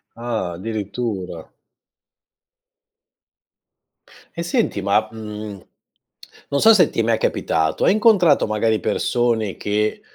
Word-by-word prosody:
Ah, 115 -6 -3
addirittura. 105 0 -5 2.9
E 170 - -3
senti, 195 - -1
ma, 100 +2 +1
mhmm, 105 -2 -8 0.9
non 140 - 0
so 225 - +8
se 180 -7 +4
ti - - -5
è - - +3
mai 115 0 +1
capitato. 80 -5 -1
Hai - - +5
incontrato 205 -8 +4
magari 110 +1 0
persone 115 0 0
che, 105 +1 -1
110 Hz, 105 wpm, -20 LUFS, 105-125 Hz, 2.9 s, so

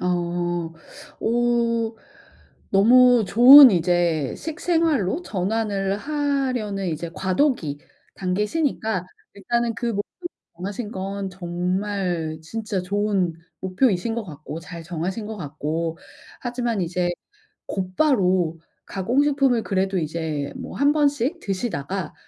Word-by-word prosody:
어. - - -2 1.1
어. 235 -1 +1 0.8
너무 245 +3 +6
좋은 255 +5 +10
이제 170 -5 +1
식생활로 320 - 0
전환을 200 - -1
하려는 260 -9 -1
이제 165 +1 -4
과도기 185 - 0 0.4
단계시니까 210 - -1 0.3
일단은 235 +3 -1
그 235 +1 -4
목표를 230 - -4 0.3
정하신 205 +4 -5
건 195 +1 -4
정말 180 -2 -2
진짜 210 +2 -3
좋은 195 -3 0 0.3
목표이신 190 +2 +1
것 235 -2 -3
같고 155 -1 -8
잘 170 0 -9
정하신 180 +6 -4
것 220 0 -6
같고 160 +1 -3 0.4
하지만 240 -4 -2
이제 175 +1 -1 0.6
곧바로 185 - +1 0.3
가공 235 +9 +1
식품을 275 -5 +2
그래도 190 -1 0
이제 155 -3 -3
뭐 - - -7
1 285 +2 +3
번씩 290 +1 +1
드시다가 190 - -3
200 Hz, 225 characters per minute, -23 LUFS, 180-240 Hz, 1.1 s, 좋은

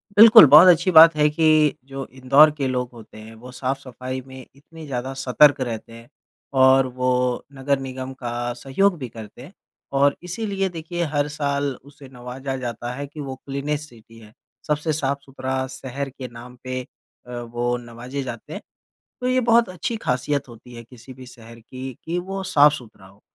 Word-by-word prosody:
बिल्कुल, 220 -2 +10
बहुत 150 +6 +8
अच्छी 175 +1 +4
बात 165 -1 +8
है 150 0 +3
कि 155 -1 +3
जो 135 0 -7
इंदौर 135 +4 +5
के 135 -3 -1
लोग 125 -1 -2
होते 110 -2 -14
हैं, 110 +1 -12
वो 125 +3 -12
साफ़-सफ़ाई 130 0 -5
में 130 -1 -11
इतनी 160 +3 -13
ज़्यादा 130 -1 -4
सतर्क 140 +3 +4
रहते 115 -2 -5
हैं 115 0 -13 0.5
और 130 0 +5
वो 125 - +1 0.4
नगर 140 0 -1
निगम 130 0 -6
का 120 0 -4
सहयोग 170 +10 0
भी 130 - -6
करते 110 +1 -11
हैं 145 +9 -13 0.5
और 140 0 +3
इसीलिए 195 +1 -3
देखिए 175 0 -5
हर 145 0 +1
साल 140 -2 -1
उसे 140 0 -15
नवाज़ा 125 +2 -6
जाता 120 -1 -5
है 140 +2 -6
कि 145 +2 -13
वो 135 -2 -5
क्लीनेस्ट 145 +2 -4
सिटी 115 -1 -18
है। 110 -1 -16 0.4
सबसे 150 +1 -1
साफ़-सुथरा 135 -2 -3
शहर 135 +1 -6
के 130 -1 -9
नाम 120 +1 -12
पे 130 0 -4 0.5
अ, 125 - -10
वो 120 +1 -2
नवाज़े 120 +3 -7
जाते 130 - -8
हैं। - - -7 0.6
तो 250 - -3
ये 255 0 +2
बहुत 235 -1 +4
अच्छी 185 +6 -4
खासियत 130 +3 -1
होती 120 +1 -14
है, 115 - -9
किसी 125 +2 -14
भी 130 0 -13
शहर 115 -1 -14
की 130 +3 -8
कि 170 +2 -2
वो 195 +2 -5
साफ़-सुथरा 145 - +1
हो 100 +2 -21
135 Hz, 175 wpm, -22 LUFS, 125-150 Hz, 0.6 s, बिल्कुल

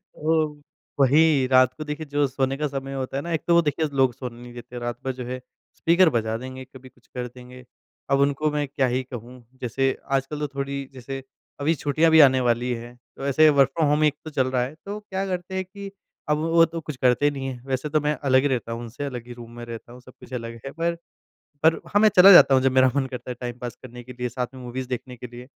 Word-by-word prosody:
ओ 160 0 +2 0.5
वही 140 0 +4
रात 130 0 +5
को 155 - -7
देखिए 150 +1 -5
जो 145 0 +1
सोने 135 +1 -1
का 150 - -1
समय 135 -1 -5
होता 135 0 -3
है 140 - -1
ना, 170 - -5
एक 160 - 0
तो 170 - +4
वो 170 - +6
देखिए 155 0 0
लोग 130 -2 +4
सोने 125 -2 -8
नहीं 120 0 -11
देते 120 0 -9
रात 120 -1 -4
भर 130 - 0
जो 125 -1 -7
है, 130 +1 -5 0.4
स्पीकर 170 +1 +4
बजा 110 -4 -1
देंगे, 130 +2 -8
कभी 130 0 -14
कुछ 125 -1 -29
कर 125 -1 -5
देंगे। 125 +1 -13 0.5
अब 140 - +3
उनको 140 +2 +2
मैं 145 -1 -1
क्या 135 -1 0
ही 125 +1 -1
कहूँ? 125 0 -10 0.2
जैसे 135 +2 0
आजकल 135 +2 -1
तो 150 - -1
थोड़ी 140 0 -3
जैसे 135 +1 -7 0.4
अभी 155 +3 +1
छुट्टियाँ 155 +3 +2
भी 160 - +7
आने 130 -2 +6
वाली 120 0 +1
हैं। 120 +1 -8 0.2
तो 135 - -5
ऐसे 155 +3 +5
वर्क 140 -2 +4
फ्रॉम 160 - +3
होम 150 +1 +2
एक 150 -1 +3
तो - - -5
चल 130 -3 +1
रहा 125 -1 +1
है 130 +4 -5
तो 205 +1 -5
क्या 195 -2 -4
करते 185 0 -4
हैं 190 - -1
कि 200 +1 -9 0.4
अब 150 - +3
वो 165 +2 +4
तो 165 0 -6
कुछ 150 -2 -6
करते 130 +3 +3
नहीं 135 -1 -5
है। 125 -2 -6
वैसे 135 +2 -2
तो 155 +1 +2
मैं 150 +1 +1
अलग 130 -1 +4
ही 145 - +1
रहता 125 -4 -2
हूँ। 115 +1 -4
उनसे 120 +4 -7
अलग 125 -4 -6
ही 120 - -8
रूम 120 -1 -11
में 120 - -7
रहता 115 0 -9
हूँ। 125 +1 -13
सब 125 - -15
कुछ 130 - -13
अलग 115 -1 -5
है। 135 - -5
पर, 170 +2 -1 0.7
पर 160 - +6
हाँ 205 - +2
मैं 215 - +7
चला 190 +2 +10
जाता 155 -6 +9
हूँ 130 - +4
जब 135 - +3
मेरा 130 0 +4
मन 140 - +1
करता 125 -1 -7
है - - -5
टाइम 120 -1 -5
पास 120 -1 -6
करने 125 -1 -10
के 125 +1 -10
लिए 125 0 -1
साथ 125 +1 -3
में 130 - -10
मूवीज़ 125 +1 -5
देखने 125 0 -5
के 125 - -8
लिए। 120 +1 -10
135 Hz, 260 wpm, -24 LUFS, 125-150 Hz, 0.7 s, चला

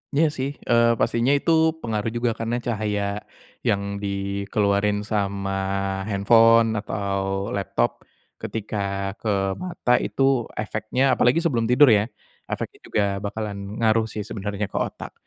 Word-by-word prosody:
Iya 160 +2 +4
sih, 135 +1 -1 0.2
eee, 115 -1 +4
pastinya 120 +3 +1
itu 165 - 0 0.3
pengaruh 110 -1 -2
juga 120 -1 +1
karena 115 +1 -1
cahaya 105 -3 -1 0.7
yang 100 0 -1
dikeluarin 100 +1 0
sama 100 -2 -1 0.6
handphone 115 +3 +5
atau 100 -2 -2
laptop 95 -11 -1 0.4
ketika 100 -2 -3
ke 110 - -2 0.2
mata 175 - -3
itu 135 -3 +1
efeknya, 110 +4 -1
apalagi 125 +6 +3
sebelum 115 -7 +1
tidur 140 +4 +7
ya 105 - +4 0.5
efeknya - - -5
juga 105 - +1 0.2
bakalan 100 0 -5
ngaruh 110 -1 +3
sih 105 -2 -5
sebenernya 105 0 -3
ke 100 - -6
otak. - - -5
105 Hz, 125 wpm, -23 LUFS, 100-115 Hz, 0.7 s, tidur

